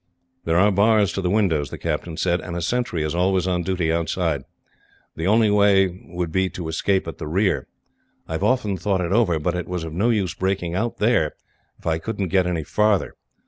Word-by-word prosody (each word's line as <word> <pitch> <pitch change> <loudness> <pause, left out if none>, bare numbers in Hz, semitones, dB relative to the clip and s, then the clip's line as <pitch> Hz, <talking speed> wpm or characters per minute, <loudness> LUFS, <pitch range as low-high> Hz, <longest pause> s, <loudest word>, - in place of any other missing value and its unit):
"There 80 +1 +2
are 100 +3 +5
bars 105 0 +3
to 95 - -2
the 90 - 0
windows," 85 -9 +1
the - - -7
captain 80 -2 -3
said, 85 0 +1
"and 85 - -6
a - - -3
sentry 110 -5 -1
is 75 0 -2
always 90 +1 +1
on 90 -1 0
duty 85 -2 0
outside. 85 -2 -1 0.7
The 80 +3 -2
only 110 +1 +4
way 95 -3 +3
would 90 -2 -4
be 95 +2 +1
to 85 -1 -6
escape 95 +4 0
at - - -7
the - - -5
rear. 90 -4 0 0.6
I - - -10
have 80 +4 -2
often 105 -4 +1
thought 95 +2 0
it 85 0 -2
over, 100 -6 +3
but 80 +3 -1
it 90 -1 -4
was 90 -2 -3
of 80 -1 -6
no 100 +8 +1
use 100 -7 0
breaking 95 -2 -2
out 110 +6 -2
there, 105 -9 +2 0.4
if - - -24
I 80 -1 0
could 105 +5 -5
not 95 -3 -1
get 95 -1 +2
any 85 -3 -1
farther. 105 +4 +1
90 Hz, 220 wpm, -22 LUFS, 85-100 Hz, 0.7 s, are